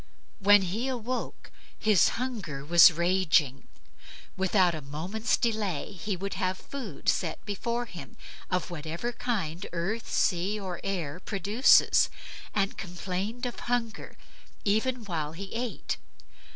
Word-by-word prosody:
When 205 0 +6
he 210 +8 -2
awoke, 255 -1 -4 0.3
his 215 -5 +4
hunger 200 - -4
was 170 +4 +8
raging. 170 -5 +2 0.7
Without 185 -1 +3
a 155 - -5
moment's 175 - -1
delay 215 -8 -1
he 195 +1 -4
would 195 +2 -4
have 185 -1 -1
food 230 - -8
set - - 0
before 235 +4 -2
him, 180 -7 -10 0.3
of 180 -1 -1
whatever 165 +8 -4
kind 195 -8 -2
earth 195 +7 -2
sea, 190 +3 +1
or 185 -3 -5
air 175 -5 -3
produces; 205 +6 +4 0.4
and 195 -1 -1
complained 190 +6 -4
of 245 - -4
hunger 235 -2 -2 0.5
even 220 +3 +1
while 160 -5 -3
he 195 +3 -8
ate. 235 0 -3
195 Hz, 125 wpm, -28 LUFS, 175-225 Hz, 0.7 s, was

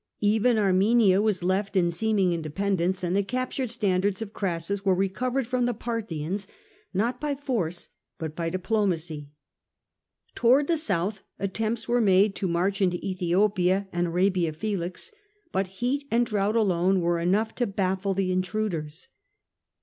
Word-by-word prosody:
Even 220 +3 +3
Armenia 200 0 +4
was 210 -4 +1
left 195 +3 0
in 175 -2 +3
seeming 195 0 +1
independence, 185 +3 -1
and 180 +1 0
the 200 - +3
captured 255 +4 -2
standards 195 -3 0
of 220 -2 -6
Crassus 190 +1 -2
were 190 -2 +3
recovered 245 +8 -1
from 250 +1 0
the 245 - -1
Parthians 200 -5 -3 0.4
not 235 +6 -1
by 295 -1 -1
force 220 - -3 0.3
but 160 -1 -5
by 165 -1 -2
diplomacy. 175 -6 -1 1.0
Towards 260 +4 +4
the 340 - +2
south 200 - -1 0.2
attempts 220 +3 -2
were 240 0 +2
made 195 0 +4
to 190 - -1
march 185 +4 0
into 180 -2 +2
^Ethiopia 185 +1 +1
and 175 0 0
Arabia 180 -1 +1
Felix, 185 - -3 0.4
but 190 0 0 0.2
heat 280 +3 0
and 235 +1 +3
drought 210 -1 0
alone 190 -3 +2
were 170 0 +1
enough 200 +6 +1
to 245 - -1
baffle 190 0 -1
the 190 -1 0
intruders. 185 -4 -2
195 Hz, 145 wpm, -26 LUFS, 180-220 Hz, 1.0 s, Armenia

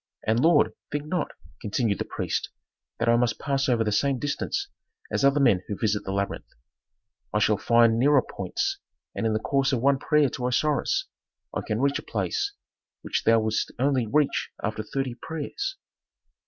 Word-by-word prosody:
And, 110 +2 +2
lord, 165 +5 +4 0.2
think 145 0 -2
not," 165 +1 -1 0.3
continued 105 -1 0
the - - -2
priest, - - -3 0.5
"that 115 - -1
I 115 - +5
must 120 -1 +1
pass 135 -1 0
over 120 -2 +3
the 105 - -1
same 135 +6 +2
distance 145 - -2 0.4
as - - 0
other 140 +1 +4
men 115 -10 +4
who 100 - -4
visit 105 -2 0
the 95 - -3
labyrinth. 100 0 -3 0.8
I - - 0
shall 105 0 +3
find 115 +1 +4
nearer 140 +1 +5
points, - - -3 0.3
and 115 - -1
in 110 - +1
the 110 - +1
course 135 +4 +1
of 130 - +1
one 135 +2 +3
prayer 150 -2 +3
to 125 +1 -3
Osiris 145 +4 +1 0.5
I - - -1
can 110 +3 -2
reach 140 0 +2
a - - -7
place 405 -2 -2 0.5
which - - -2
thou 115 0 +5
wouldst 110 0 -1
only 130 -2 +1
reach 140 +4 +1
after 110 +1 -2
thirty 130 +3 -3
prayers." 275 - -4
125 Hz, 180 wpm, -26 LUFS, 110-145 Hz, 0.8 s, I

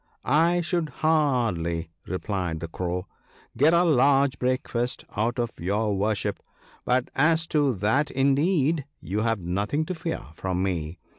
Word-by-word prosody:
' - - -39
I 165 +6 +3
should 170 -2 -1 0.2
hardly/ 115 - +1 0.2
replied 90 -3 -3
the 85 - -5
Crow, 90 +2 -3 0.2
* - - -30
get 145 +7 +5
a 170 +1 +4
large 140 -3 +3
breakfast 125 -1 -1
out 115 +4 0
of 120 -2 -1
your 105 +4 0
worship; 105 +1 -1 0.5
but 125 0 +1
as 160 +3 +3
to 145 -5 +2
that 110 +10 +1
indeed 140 +2 +2
you 95 +6 -3
have 115 -3 0
nothing 100 - -1
to 185 - -3
fear 165 -1 -4
from 95 +2 -2
me. 85 -3 -2
120 Hz, 150 wpm, -26 LUFS, 95-150 Hz, 0.5 s, get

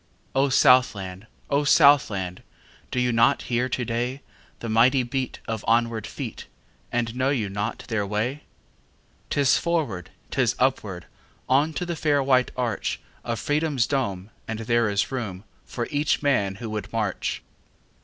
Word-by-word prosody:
O 135 +1 +3
Southland! 110 -7 +3 0.2
O 140 +1 +3
Southland! 125 - +4 0.5
Do 125 - -1
you 125 0 +2
not 115 +1 +3
hear 125 +1 0
to 125 -1 -2
dayThe 120 +1 -5
mighty 125 +4 +4
beat 130 +1 -3
of 110 -2 -3
onward 115 -1 +1
feet, - - -7 0.4
And 120 -1 -1
know 130 +1 +1
you 115 -8 0
not 105 +3 -4
their 110 -3 0
way?'Tis 130 +4 -3
forward, 145 - -1 0.2
'tis - - +1
upward, - - 0 0.4
On 140 +5 +3
to 180 - -3
the 175 -1 -3
fair 145 -3 +2
white 130 -1 +3
archOf 120 -5 -1 0.4
Freedom's 145 -1 +1
dome, 105 -8 -2 0.2
and 110 0 -4
there 115 0 +2
is 100 0 +2
roomFor 115 0 -6
each 145 0 +1
man 105 -9 +2
who 110 +2 -6
would 105 -1 -4
march. 105 -4 -2
120 Hz, 135 wpm, -25 LUFS, 110-135 Hz, 0.5 s, Southland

